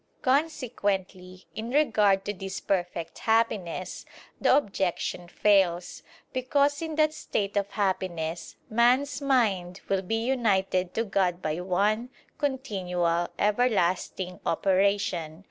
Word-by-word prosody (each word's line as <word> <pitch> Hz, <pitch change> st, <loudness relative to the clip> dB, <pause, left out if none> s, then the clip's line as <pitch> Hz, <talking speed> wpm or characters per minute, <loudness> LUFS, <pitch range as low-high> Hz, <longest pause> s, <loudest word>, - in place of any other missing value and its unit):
Consequently 205 Hz, -, -1 dB
in 225 Hz, +2 st, -5 dB
regard 215 Hz, -9 st, +3 dB
to 205 Hz, -, -2 dB
this 195 Hz, 0 st, -6 dB
perfect 175 Hz, -3 st, -2 dB
happiness, 215 Hz, -6 st, 0 dB, 0.4 s
the -, -, +5 dB
objection 190 Hz, -7 st, -2 dB
fails: 180 Hz, -2 st, +2 dB, 0.3 s
because 280 Hz, +3 st, +1 dB
in 320 Hz, -1 st, -4 dB
that 310 Hz, 0 st, +3 dB
state 210 Hz, -9 st, -3 dB
of 200 Hz, -1 st, 0 dB
happiness, 180 Hz, -5 st, -2 dB
man's 250 Hz, +4 st, +2 dB
mind 200 Hz, -10 st, +1 dB
will 195 Hz, -1 st, +2 dB
be 225 Hz, +4 st, -2 dB
united 195 Hz, -8 st, +1 dB
to 225 Hz, -, +1 dB
God 190 Hz, -4 st, 0 dB
by 155 Hz, -2 st, -2 dB
one, 205 Hz, +6 st, 0 dB, 0.3 s
continual, 180 Hz, -, -1 dB
everlasting 190 Hz, -4 st, 0 dB
operation. 185 Hz, -3 st, +1 dB
200 Hz, 110 wpm, -27 LUFS, 180-240 Hz, 0.4 s, the